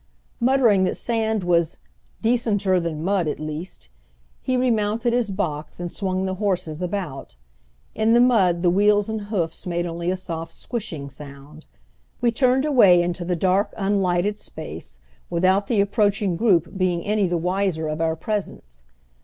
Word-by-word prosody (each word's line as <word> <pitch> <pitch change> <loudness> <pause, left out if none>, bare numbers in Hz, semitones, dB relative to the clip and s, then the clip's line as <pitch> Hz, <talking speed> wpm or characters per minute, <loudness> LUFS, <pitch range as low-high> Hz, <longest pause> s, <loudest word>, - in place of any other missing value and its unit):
Muttering 235 -6 +4
that - - -1
sand 220 -3 -1
was 170 -2 +1 0.5
"decenter 210 -5 +2
than 165 -2 -3
mud 190 -2 +1
at 150 - -3
least," 155 - -6 0.5
he 255 -1 0
remounted 230 -1 +1
his 240 -3 +1
box 160 -7 -4
and 175 -1 -4
swung 190 -2 -2
the 190 - -2
horses 180 -5 -1
about. 180 - -4 0.6
In 220 +1 +2
the - - +6
mud 195 -9 +3
the 175 - +4
wheels 205 +2 +3
and 220 -2 -3
hoofs 185 -5 -3
made 175 0 -1
only 170 0 -3
a 185 - 0
soft 165 -2 -6
"squshing" 180 -12 -5
sound. 140 +2 -12 0.5
We 240 -1 +2
turned 255 +3 +2
away 200 -12 +6
into 175 0 -3
the 180 +1 -1
dark, 190 +4 +1
unlighted 195 0 0
space - - -9 0.3
without 185 +4 +2
the 220 -4 +2
approaching 200 -2 +1
group 175 -5 +2
being 180 -3 0
any 210 -2 +1
the 175 0 0
wiser 180 -2 -1
of 155 +1 -3
our 160 -1 +1
presence. 160 - -5
185 Hz, 155 wpm, -23 LUFS, 170-210 Hz, 0.6 s, the